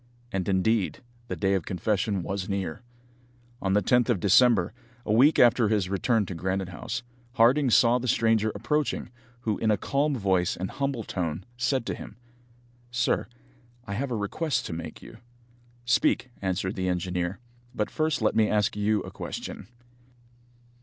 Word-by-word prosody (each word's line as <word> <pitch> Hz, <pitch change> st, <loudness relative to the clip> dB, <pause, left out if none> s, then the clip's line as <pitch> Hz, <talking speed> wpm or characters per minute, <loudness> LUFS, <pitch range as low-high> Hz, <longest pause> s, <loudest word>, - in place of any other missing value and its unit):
And, 95 Hz, -2 st, -2 dB
indeed, 95 Hz, +2 st, +1 dB, 0.2 s
the -, -, -3 dB
day 95 Hz, -1 st, +1 dB
of 95 Hz, -4 st, -1 dB
confession 100 Hz, +1 st, -1 dB
was 95 Hz, +1 st, -4 dB
near. 95 Hz, -1 st, -3 dB, 0.8 s
On 95 Hz, -1 st, 0 dB
the 105 Hz, 0 st, +3 dB
10th 125 Hz, +5 st, +3 dB
of 115 Hz, -6 st, +2 dB
December, 100 Hz, 0 st, +4 dB, 0.3 s
a 105 Hz, -, +1 dB
week 135 Hz, +8 st, +5 dB
after 120 Hz, -1 st, +5 dB
his 100 Hz, -4 st, +1 dB
return 105 Hz, +2 st, +1 dB
to 95 Hz, -, -6 dB
Granite 95 Hz, +2 st, -2 dB
House, 90 Hz, +6 st, -5 dB, 0.3 s
Harding 125 Hz, +4 st, +4 dB
saw 120 Hz, +1 st, +5 dB
the 125 Hz, -, -4 dB
stranger 110 Hz, -2 st, +2 dB
approaching, 150 Hz, -5 st, -1 dB, 0.3 s
who, 110 Hz, -3 st, -1 dB
in 110 Hz, -, +1 dB
a 105 Hz, -, +3 dB
calm 145 Hz, +5 st, 0 dB
voice 95 Hz, -5 st, +1 dB
and 95 Hz, +1 st, -4 dB
humble 140 Hz, -4 st, -2 dB
tone, 90 Hz, -2 st, -3 dB
said 120 Hz, +1 st, 0 dB
to -, -, -2 dB
him: 105 Hz, -, -9 dB, 0.7 s
"Sir, 120 Hz, -4 st, 0 dB, 0.6 s
I 100 Hz, -, -5 dB
have 130 Hz, +7 st, -2 dB
a 120 Hz, -, -2 dB
request 130 Hz, +9 st, -1 dB
to -, -, -4 dB
make 80 Hz, -1 st, -7 dB
you." -, -, -12 dB, 0.7 s
"Speak," 125 Hz, 0 st, +2 dB
answered 95 Hz, 0 st, -1 dB
the 95 Hz, -2 st, -2 dB
engineer; 90 Hz, +1 st, -2 dB, 0.4 s
"but 105 Hz, -, -1 dB
first 155 Hz, -6 st, 0 dB
let 110 Hz, -, +2 dB
me 110 Hz, -1 st, +3 dB
ask 105 Hz, -1 st, +1 dB
you 105 Hz, 0 st, +1 dB
a -, -, -8 dB
question." -, -, -6 dB
105 Hz, 165 wpm, -27 LUFS, 95-120 Hz, 0.8 s, week